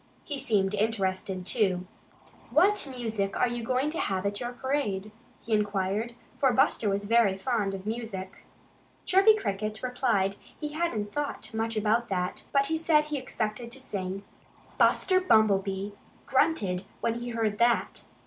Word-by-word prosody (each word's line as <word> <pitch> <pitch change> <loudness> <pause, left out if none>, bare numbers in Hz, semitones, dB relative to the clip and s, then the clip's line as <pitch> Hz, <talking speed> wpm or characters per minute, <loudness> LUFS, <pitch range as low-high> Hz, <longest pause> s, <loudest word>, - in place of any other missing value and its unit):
He 285 -3 -4
seemed 205 -5 +1
interested, 190 -3 -1
too. 185 -5 +1 0.6
"What 355 - +3
music 220 -6 -2
are - - +3
you 240 0 -3
going 255 +5 0
to 330 - -3
have 190 -1 -1
at 205 0 -1
your 240 0 -3
parade?" 245 -6 -2 0.3
he 230 - -4
inquired, 210 +2 0 0.2
for 270 -3 +4
Buster 235 -3 +2
was 200 +1 -1
very 220 -3 +3
fond 200 -2 -1
of 190 0 -8
music. 215 -4 -5 0.6
Chirpy 390 +4 +6
Cricket 215 - -3
replied 250 -6 +1
that 200 - -13 0.2
he 300 - -3
hadn't 295 -10 -2
thought 290 -5 -3
much 225 0 -1
about 225 +3 +1
that, 180 -2 -2
but 275 0 +3
he 320 +3 0
said 315 -2 +3
he 300 -1 -3
expected 235 -2 -4
to 270 - -8
sing. 195 -5 -4 0.6
Buster 370 -1 +4
Bumblebee 200 - +2 0.3
grunted 190 - +1 0.2
when 230 - +1
he 240 0 -5
heard 225 -3 -1
that. 235 0 +2
220 Hz, 155 wpm, -28 LUFS, 195-255 Hz, 0.6 s, Chirpy